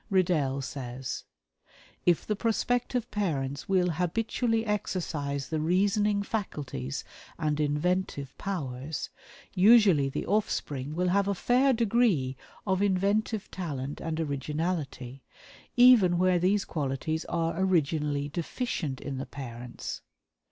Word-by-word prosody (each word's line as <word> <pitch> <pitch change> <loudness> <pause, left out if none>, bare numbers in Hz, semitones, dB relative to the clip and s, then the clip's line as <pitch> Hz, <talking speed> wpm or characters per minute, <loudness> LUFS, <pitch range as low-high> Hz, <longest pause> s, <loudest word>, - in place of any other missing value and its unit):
Riddell 155 -8 +2
says: 130 -1 -5 0.8
"If 175 -2 +3
the 210 - 0
prospective 240 +2 0
parents 145 -10 -2
will 180 -2 +3
habitually 225 - 0
exercise 155 -9 -2
the 160 - -1
reasoning 200 +5 +2
faculties 140 - -4 0.3
and 150 -2 0
inventive 150 -1 -1
powers, 145 -6 -4 0.4
usually 190 -8 +6
the - - -3
offspring 150 -9 -1
will 180 +1 +1
have 200 +2 +2
a 200 - +1
fair 255 +7 +3
degree 220 - +2 0.3
of 190 -1 +1
inventive 200 +2 +1
talent 145 -6 -4
and 160 -1 -3
originality, 145 -3 -3 0.6
even 235 -8 +7
where 180 0 +3
these 190 +3 +2
qualities 155 +2 -2
are 165 +1 -1
originally 150 -5 +1
deficient 160 - -3
in 135 -2 -4
the 135 - -5
parents. 120 -3 -7
170 Hz, 110 wpm, -29 LUFS, 140-200 Hz, 0.8 s, even